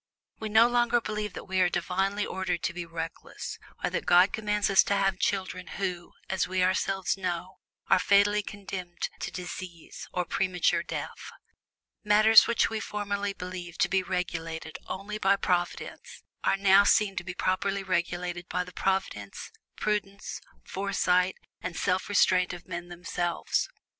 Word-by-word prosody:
We 220 - -4
no 220 +2 +6
longer 240 0 +3
believe 210 -3 -4
that - - -7
we 190 0 0
are 180 - +4
divinely 195 +4 0
ordered 180 -3 -2
to 185 - -1
be 175 -1 -5
reckless, 165 0 -6 0.2
or - - 0
that - - -3
God 180 +2 +6
commands 210 -1 0
us 195 - +7
to 200 - +1
have 195 -1 +1
children 185 -2 -1
who, 180 -3 -3
as 190 -1 0
we 185 0 +1
ourselves 190 +1 +1
know, 180 -1 -4 0.3
are - - +5
fatally 200 +2 +4
condemned 190 -4 -5
to - - -3
disease 180 -2 -8
or 180 -1 -1
premature 180 0 +1
death. - - -6 0.7
Matters 215 +1 +7
which 235 - +3
we 220 - -3
formerly 205 -1 -2
believed 180 -2 -7
to - - +4
be 190 -1 +2
regulated 165 -3 -4
only 205 +3 -5
by 195 0 +4
Providence, 175 -2 -2 0.2
are - - +3
now 195 0 +6
seen 200 -1 +3
to - - -2
be 180 0 -6
properly 195 +2 0
regulated 175 -1 -2
by 180 - 0
the 180 0 -12
providence, 190 - -2 0.2
prudence, 200 -1 -2 0.2
foresight, 185 -2 +1 0.3
and 180 -2 -5
self 185 +1 0
restraint 185 -2 +3
of 175 -1 -10
men 175 -1 -5
themselves. 175 - -2
190 Hz, 155 wpm, -28 LUFS, 180-200 Hz, 0.7 s, us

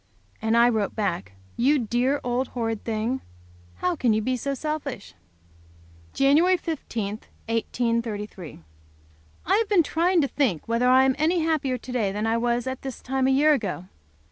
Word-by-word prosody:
And 225 +1 +2
I 235 +1 +6
wrote 220 -4 0
back. 100 - -2 0.2
"You 280 +5 +3
dear 250 +3 0
old 245 +1 -1
horrid 225 -2 -2
thing. 230 +3 -2 0.5
How 360 -1 -1
can 245 -7 +2
you 215 - +1
be 255 +3 0
so 275 +3 -3
selfish?" 290 -6 -5 1.0
Jan. 275 +2 +4 0.2
15, 265 - -4 0.4
1833. 225 - -2 0.9
I 385 +4 +3
have 450 -1 0
been 385 -5 +5
trying 340 +4 +2
to 280 - +1
think 240 - -1
whether 235 +2 +2
I 260 +1 +6
am 265 0 +3
any 330 +3 +2
happier 300 -5 0
to 250 - -10
day 220 -6 0
than 210 +2 -2
I 225 +1 +1
was 240 0 0
at 260 0 -4
this 265 -2 -6
time 265 0 -1
a - - +3
year 290 +3 +5
ago. 190 -8 -3
250 Hz, 170 wpm, -25 LUFS, 225-280 Hz, 1.0 s, I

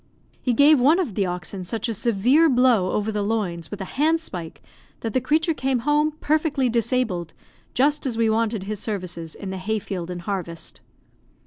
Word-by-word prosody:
He 250 - +1
gave 285 +4 +6
one 290 +7 +5
of 345 - -1
the 195 0 0
oxen 180 +2 -5
such 225 +7 -3
a 230 - -1
severe 240 - +3
blow 245 -7 +4
over 210 +1 0
the 210 -1 -1
loins 200 -6 -2
with 205 - -6
a - - -3 0.2
handspike 305 - -1 0.4
that 225 -2 -3
the 255 - +2
creature 315 +5 +2
came 265 -4 -1
home 300 +1 +2
perfectly 295 -4 +1
disabled, 230 -7 -1 0.4
just 285 +2 +2
as 235 -3 -2
we 230 -1 +3
wanted 220 -2 0
his 210 +1 -4
services 180 -7 -5
in 195 -2 -6
the 190 - -4
hay 220 +4 -1
field 180 -4 -5
and 175 -1 -6
harvest. 170 -4 -5
225 Hz, 185 wpm, -23 LUFS, 190-265 Hz, 0.4 s, gave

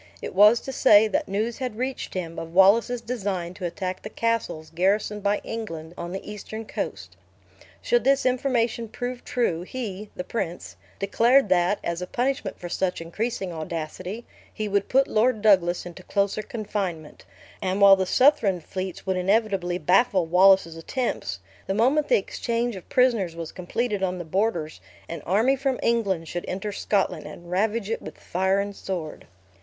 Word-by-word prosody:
It - - -6
was 210 +5 +7
to 270 - -6
say, 215 -4 +6
that 215 - -1
news 215 +4 -2
had 250 -5 -4
reached 255 -2 -4
him 170 -2 -4
of 165 +1 -8
Wallace's 225 +5 +5
design 200 -7 -3
to 185 -2 -4
attack 185 +1 -4
the - - -7
castles 230 -9 -2
garrisoned 200 +4 +1
by 205 +1 +1
England, 165 -8 -6
on 170 -1 -6
the 190 - -6
eastern 215 +2 -7
coast. - - -5 0.7
Should 485 0 +2
this 275 0 +3
information 245 -3 +1
prove 245 +3 -5
true, 205 -9 0
he 210 -1 -6
(the 180 - -4
prince) 180 -4 -4 0.2
declared 230 +4 +3
that, 180 +2 +3
as 170 +1 -2
a 180 - -4
punishment 250 -4 -2
for 175 - -7
such 180 +1 -1
increasing 190 +2 -3
audacity, 170 +6 -5 0.3
he 215 -1 -4
would 200 0 0
put 270 +1 +4
Lord 220 0 +1
Douglas 180 -5 +4
into 175 +1 -9
closer 200 +2 0
confinement; 200 - -5 0.4
and 190 +1 -1
while 200 -1 +9
the 190 -1 -1
Southron 245 -7 +4
fleets 185 +2 -6
would 190 -1 0
inevitably 190 -2 +1
baffle 185 0 +3
Wallace's 180 -1 +5
attempts, 165 - -3 0.3
the 195 - -1
moment 265 +7 +3
the - - +5
exchange 235 - -2
of 185 - -11
prisoners 230 -10 +2
was 165 -1 -6
completed 205 +3 -2
on 185 -1 -1
the 175 - -6
borders, 170 -3 -1 0.3
an 170 - -6
army 220 +9 +3
from 270 -1 -1
England 200 -8 +1
should 175 +1 -4
enter 195 +3 -3
Scotland, 200 0 -1
and 175 0 -11
ravage 210 +3 0
it 225 - -2
with 155 - -9
fire 190 +2 0
and 200 0 -3
sword. 175 -7 -6
200 Hz, 170 wpm, -25 LUFS, 180-230 Hz, 0.7 s, while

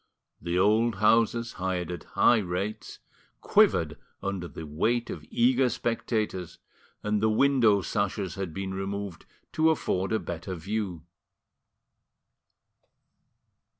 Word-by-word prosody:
The 85 +1 -1
old 110 +4 +3
houses, 115 +3 +2
hired 90 -2 -1
at 85 -3 -7
high 120 - +6
rates, 95 +2 -4 0.4
quivered - - +3 0.2
under 100 -3 -3
the 80 - -8
weight 115 +11 0
of 75 - -7
eager 125 +2 +3
spectators, 110 -7 -2 0.5
and 105 0 0
the 110 - +3
window 110 -4 +4
sashes 100 -3 -2
had 95 -3 -4
been 95 +3 -4
removed 95 -2 -5 0.2
to 160 0 +3
afford 95 -11 0
a 110 - +3
better 90 0 -5
view. 95 -1 -4
100 Hz, 115 wpm, -27 LUFS, 90-115 Hz, 0.5 s, high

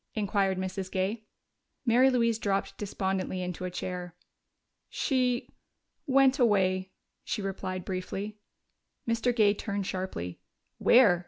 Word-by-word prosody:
inquired 200 -2 +1
Mrs. 185 0 -3
Gay. 200 +4 -1 0.6
Mary 250 +2 +5
Louise 230 -3 +2
dropped 195 -2 -1
despondently 190 -2 -2
into 180 0 -4
a - - -2
chair. 180 -1 -5 0.7
"She 250 -3 +1 0.6
went 270 0 +5
away," 190 -5 +3 0.3
she 205 - -3
replied 185 -1 -4
briefly. 195 +3 -4 0.7
Mr. 230 +1 +2
Gay 210 -3 +5
turned 200 -1 -3
sharply. 185 - -4 0.4
"Where?" 220 -8 +6
195 Hz, 110 wpm, -29 LUFS, 185-230 Hz, 0.7 s, Where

